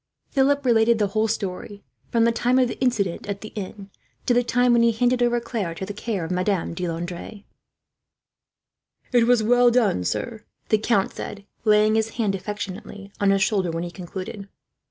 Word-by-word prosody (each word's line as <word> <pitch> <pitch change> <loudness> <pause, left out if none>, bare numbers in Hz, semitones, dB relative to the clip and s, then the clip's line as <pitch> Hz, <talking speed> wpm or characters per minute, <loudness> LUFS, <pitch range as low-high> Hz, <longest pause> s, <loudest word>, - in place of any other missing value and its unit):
Philip 280 +1 +2
related 230 -1 +4
the 205 -2 +1
whole 215 +3 +1
story, 205 -1 -4 0.3
from 230 -1 +3
the 235 - +4
time 245 +2 +1
of 255 -1 +4
the - - -6
incident 215 -10 0
at 200 0 -4
the 215 - -7
inn, 200 -1 -8 0.3
to 245 - +3
the 245 - +4
time 245 +1 +2
when 235 - +4
he 235 0 +4
handed 245 +2 +1
over 240 0 +2
Claire 220 -8 -4
to 190 - -5
the 205 - -6
care 205 -4 -3
of 160 - -6
Madame 180 -1 0
de 180 +1 -3
Landres. 175 +4 -6 1.7
"It 240 -2 +4
was 245 -2 +4
well 245 +2 +5
done, 230 - +2
sir," 220 - -3 0.3
the 215 - +3
count 210 -3 +1
said, 200 0 -7 0.2
laying 215 0 +4
his 220 0 0
hand 215 -4 +1
affectionately 200 0 -6
on 200 - +3
his 195 0 +3
shoulder, 195 -5 +1
when 165 +1 -3
he 175 - -5
concluded. 190 +3 -7
215 Hz, 190 wpm, -23 LUFS, 195-235 Hz, 1.7 s, well